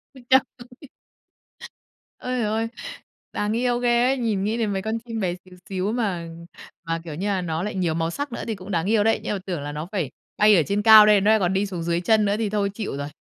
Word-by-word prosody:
Ui 260 - -13
cha 265 0 +7 0.4
ui! 280 - -13 1.3
Ơi 255 0 -3
giời 220 - 0
ơi, 220 +2 -1 0.7
đáng 210 +1 -1
yêu 245 0 0
ghê 240 0 +2
ấy. 270 +1 +1
Nhìn 220 -6 -1
nghĩ 220 +3 -1
đến 220 -3 -1
mấy 195 - -2
con 220 +3 -3
chim 225 -1 -6
bé 180 -3 -1
xíu 180 0 -16
xíu 190 +2 -2
mà 195 -8 -2 0.6
mà, 165 0 -1
kiểu 160 -3 -7
như 195 +6 -3
nà, 195 -2 0
nó 165 0 -3
lại 210 - -4
nhiều 175 -4 0
màu 165 0 -1
sắc 285 +4 -4
nữa - - -5
thì 225 - -2
cũng 190 +1 -10
đáng 170 -1 0
yêu 210 0 +2
đấy. 225 - +2
Nhưng - - -2
mà - - -4
tưởng 175 -6 -4
là 145 +1 -5
nó 150 +3 -6
phải 180 - -2 0.3
bay 210 0 +6
ở 170 - +4
trên 200 +7 -1
cao, 220 -1 +9
đây 210 -2 +5
nó 210 +2 +4
nại 220 - +4
còn 185 -1 0
đi 195 +2 +1
xuống 180 -4 -5
dưới 170 +1 -1
chân 215 +2 +3
nữa 200 0 +1
thì 220 -2 -1
thôi 200 -1 0
chịu 205 -9 -5
rồi. 140 - -4
205 Hz, 265 wpm, -23 LUFS, 180-225 Hz, 1.3 s, cao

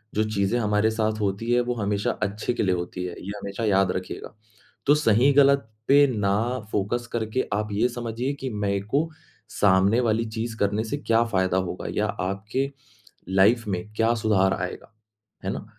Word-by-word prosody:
जो 110 - +3
चीज़ें 100 +4 +1
हमारे 105 0 +2
साथ 110 -1 -1
होती 100 +4 -1
है 120 0 +4
वो 120 0 -1
हमेशा 100 -2 0
अच्छे 105 +4 -2
के - - -1
लिए 95 -2 +2
होती 90 +1 -4
है, 90 - -5
ये 100 - -6
हमेशा 100 +3 -4
याद 95 -2 +3
रखिएगा। 90 +3 -6 0.5
तो 145 - +6
सही-गलत 140 0 +4 0.2
पे 145 +1 +7
ना 100 -1 +1 0.4
फ़ोकस 110 +4 -1
करके 110 +2 -1
आप 105 0 -1
ये 110 +5 +2
समझिए 120 +2 -3
कि 130 - -3
मेरे 100 -2 -1
को 160 +3 +2 0.4
सामने 100 +3 +3
वाली 115 -1 +1
चीज़ 115 +1 -4
करने 105 +2 0
से 130 +6 -3
क्या 115 -4 +2
फायदा 95 -1 +2
होगा - - -5
या - - +1
आपके 105 +9 -2 0.6
लाइफ़ 105 +4 +3
में, 95 +3 -4
क्या 115 +1 +3
सुधार 105 -4 +2
आएगा, 90 +5 -5 0.5
हैं 95 - 0
ना? - - -5
110 Hz, 175 wpm, -25 LUFS, 100-120 Hz, 0.6 s, पे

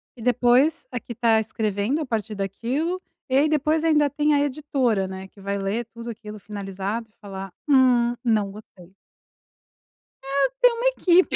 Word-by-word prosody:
e 240 - -12
depois 250 +5 +3
a 245 - -3
que 235 - -11
está 230 -1 +3
escrevendo 215 +4 -1
a 310 - -2
partir 220 -3 -3
daquilo 250 - -2 0.3
e 260 - +1
aí 290 +3 +4
depois 305 +1 +1
ainda 300 -3 +4
tem 295 +2 +1
a 290 - +4
editora, 260 -8 0
né, 190 0 -7
que 200 - -18
vai 200 +1 -2
ler 200 +4 -2
tudo 235 0 -7
aquilo 215 -2 -8
finalizado 200 +2 -5
e - - -36
falar: 195 -1 -7 0.2
"Hum, 250 -3 +4
não 215 -4 +2
gostei". 195 -3 -14 1.3
É, 275 - +1
tem - - +7
uma 470 +1 -3
equipe, 370 -7 +3
235 Hz, 170 wpm, -24 LUFS, 205-285 Hz, 1.3 s, tem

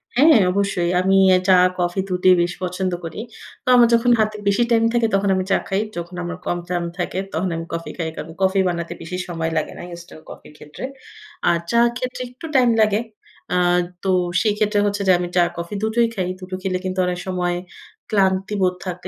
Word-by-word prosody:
হ্যাঁ, 300 +1 +6
অবশ্যই। 195 -3 0
আমি 190 +1 +2 0.2
এ - - +5
চা, 190 - +6 0.3
কফি 175 +2 0
দুটিই 185 0 +4
বেশ 175 0 0
পছন্দ 185 +1 -2
করি। 165 +4 -6 0.4
তো - - -38
আমার 240 -1 +7
যখন 235 +1 +4
হাতে 215 0 +1
বেশি 200 +4 +3
টাইম 230 -1 +4
থাকে, 235 -1 +2
তখন 195 0 +1
আমি 185 - 0
চা - - +5
খাই। 195 +1 0 0.2
যখন 175 +1 -6
আমার 175 +1 -5
কম 175 - -1
টাইম 175 -1 -1
থাকে, 180 0 -3 0.2
তখন 175 +4 -1
আমি 165 0 -4
কফি 165 0 -4
খাই। 165 -2 -2
কারণ, 165 - -7
কফি 190 +1 +3
বানাতে 170 -1 -4
বেশি 170 +2 -5
সময় 165 -2 -2
লাগে 155 - -1
না, - - -8
ইনস্ট্যান্ট 170 -2 -12
কফির - - -12
ক্ষেত্রে। 150 +8 -11 0.7
আর 170 - +3
চা'র 235 0 +4
ক্ষেত্রে 255 0 -5
একটু 250 +6 -11
টাইম 250 -2 +5
লাগে। 215 0 +3 0.5
আ - - +2 0.5
তো 195 - -1 0.3
সেই 215 -2 +2
ক্ষেত্রে 210 -1 +1
হচ্ছে 205 0 -1
যে - - +7
আমি 175 - -2
চা, 180 - +5 0.2
কফি 170 +3 -5
দুটোই 230 +2 +2
খাই। 185 -2 -1
দুটো 185 0 -6
খেলে 185 -2 0
কিন্তু 185 0 -2
অনেক 180 0 -2
সময় 180 -1 -1 0.5
ক্লান্তি 195 -1 +1
বোধ 185 -1 +3
থাকলে 180 0 -5
185 Hz, 205 wpm, -21 LUFS, 175-210 Hz, 0.7 s, আমার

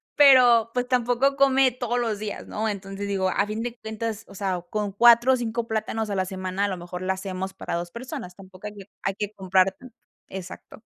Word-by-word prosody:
pero, 245 -5 +7
pues, 250 0 -1
tampoco 250 +2 +2
come 270 -2 +4
todos 245 0 -2
los 220 -4 -1
días, 210 -1 -6
¿no? 220 +1 -2
Entonces, 200 0 -5
digo, 190 -2 0
a 200 - +1
fin 215 +1 -3
de 240 0 -5
cuentas, 220 0 -4
o - - -14
sea, 185 -3 -2
con 210 -2 -3
4 240 +3 +7
o - - +5
5 235 0 -3
plátanos 220 0 -2
a 200 - -2
la 190 -1 0
semana, 185 +1 -2
a - - 0
lo 190 -2 -3
mejor, 175 +1 -7
la 190 +1 0
hacemos 190 0 -5
para 180 - -4
2 175 0 -4
personas, 240 - -7
tampoco 190 +1 -11
hay 210 - -8
que 200 - -9 0.2
hay 195 - -1
que 210 0 -3
comprar, 190 -1 +2
mm 255 - -11 0.4
exacto. 190 +3 -9
210 Hz, 220 wpm, -25 LUFS, 190-240 Hz, 0.4 s, pero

